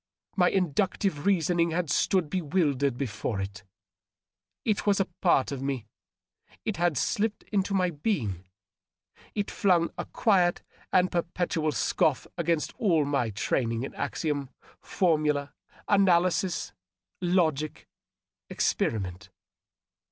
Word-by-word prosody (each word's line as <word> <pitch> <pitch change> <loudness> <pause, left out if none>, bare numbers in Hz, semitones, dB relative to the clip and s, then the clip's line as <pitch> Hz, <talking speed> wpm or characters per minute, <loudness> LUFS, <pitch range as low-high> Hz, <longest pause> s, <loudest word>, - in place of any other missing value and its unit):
My 180 -2 +4
inductive 185 -1 0
reasoning 170 -2 +2
had 165 -2 -1
stood 185 0 +2
bewildered 145 -6 0
before 110 -4 -3
it. 100 +2 -5 1.0
It 215 -1 0
was 200 -1 +4
a 195 - +3 0.2
part 135 - +3
of 135 -2 -4
me; 135 -4 -2 0.8
it 215 - -2
had 170 -4 +1
slipped 210 - 0
into 200 -1 +1
my 180 -2 +2
being; 135 - -2 0.9
it 205 -1 -2
flung 175 -4 +2
a - - -2
quiet 180 -5 +2 0.3
and 185 0 +3
perpetual 170 -2 -1
scoff 150 -1 +1
against 170 -2 0
all 165 -9 +3
my 140 -5 0
training 115 +3 -1
in 135 - -5
axiom, 145 -4 -2 0.3
formula, 150 -5 +1 0.3
analysis, 185 - +2 0.5
logic, 160 -5 0 0.6
experiment. 95 -3 -1
165 Hz, 110 wpm, -28 LUFS, 140-185 Hz, 1.0 s, My